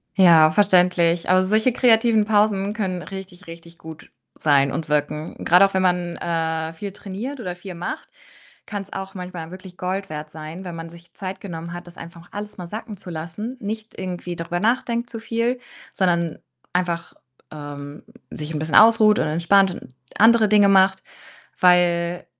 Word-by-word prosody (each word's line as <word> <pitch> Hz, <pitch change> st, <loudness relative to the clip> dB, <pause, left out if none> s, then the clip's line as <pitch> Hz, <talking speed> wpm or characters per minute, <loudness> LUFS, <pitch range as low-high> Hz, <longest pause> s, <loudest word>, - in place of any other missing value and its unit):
Ja, 165 Hz, -5 st, +7 dB
verständlich. 180 Hz, -3 st, +3 dB
Aber 185 Hz, 0 st, +5 dB
solche 215 Hz, +6 st, +2 dB
kreativen 225 Hz, -3 st, +4 dB
Pausen 205 Hz, -1 st, +2 dB
können 185 Hz, -5 st, -3 dB
richtig, 190 Hz, +2 st, -10 dB
richtig 170 Hz, 0 st, -12 dB
gut 160 Hz, 0 st, -12 dB, 0.2 s
sein 140 Hz, -2 st, +3 dB
und 155 Hz, +3 st, -4 dB
wirken. 150 Hz, +1 st, -2 dB
Grad 180 Hz, +3 st, +6 dB
auch, 195 Hz, -, +3 dB
wenn 190 Hz, -, +1 dB
man, 180 Hz, -2 st, 0 dB
äh, 160 Hz, -1 st, -2 dB
viel 200 Hz, +5 st, -6 dB
trainiert 210 Hz, +8 st, -7 dB
oder 180 Hz, -6 st, -5 dB
viel 180 Hz, +1 st, -9 dB
macht, 175 Hz, -, -6 dB, 0.6 s
kann's 200 Hz, -2 st, -6 dB
auch 195 Hz, 0 st, -6 dB
manchmal 180 Hz, -3 st, -7 dB
wirklich 185 Hz, 0 st, -11 dB
Gold 185 Hz, +2 st, -3 dB
wert 155 Hz, 0 st, -6 dB
sein, 155 Hz, +4 st, -9 dB
wenn 175 Hz, -2 st, -6 dB
man 165 Hz, 0 st, -7 dB
sich 170 Hz, +1 st, -16 dB
Zeit 190 Hz, -1 st, -7 dB
genommen 170 Hz, -3 st, -7 dB
hat, 175 Hz, 0 st, -8 dB
das 175 Hz, -, -14 dB
einfach 170 Hz, 0 st, -12 dB
alles 210 Hz, +1 st, -7 dB
mal 175 Hz, -2 st, -7 dB
sacken 215 Hz, +2 st, -7 dB
zu 185 Hz, -, -11 dB
lassen, 175 Hz, +10 st, -6 dB
nicht 220 Hz, +1 st, -6 dB
irgendwie 180 Hz, -1 st, -5 dB
darüber 170 Hz, +1 st, -3 dB
nachdenkt 235 Hz, +2 st, 0 dB
zu 230 Hz, -, -6 dB
viel, 230 Hz, +2 st, -1 dB, 0.3 s
sondern 170 Hz, -3 st, 0 dB, 0.3 s
einfach, 175 Hz, -2 st, -2 dB, 0.4 s
ähm, 145 Hz, -1 st, -8 dB, 0.3 s
sich 150 Hz, +1 st, -6 dB
'n 150 Hz, -, -2 dB
bisschen 155 Hz, +1 st, -2 dB
ausruht 220 Hz, -1 st, +6 dB
und -, -, +1 dB
entspannt 175 Hz, +5 st, +3 dB
und -, -, -11 dB, 0.3 s
andere 225 Hz, 0 st, +6 dB
Dinge 205 Hz, -1 st, +5 dB
macht, 190 Hz, 0 st, +4 dB, 0.6 s
weil 175 Hz, -1 st, +3 dB
180 Hz, 170 wpm, -22 LUFS, 170-205 Hz, 0.6 s, Ja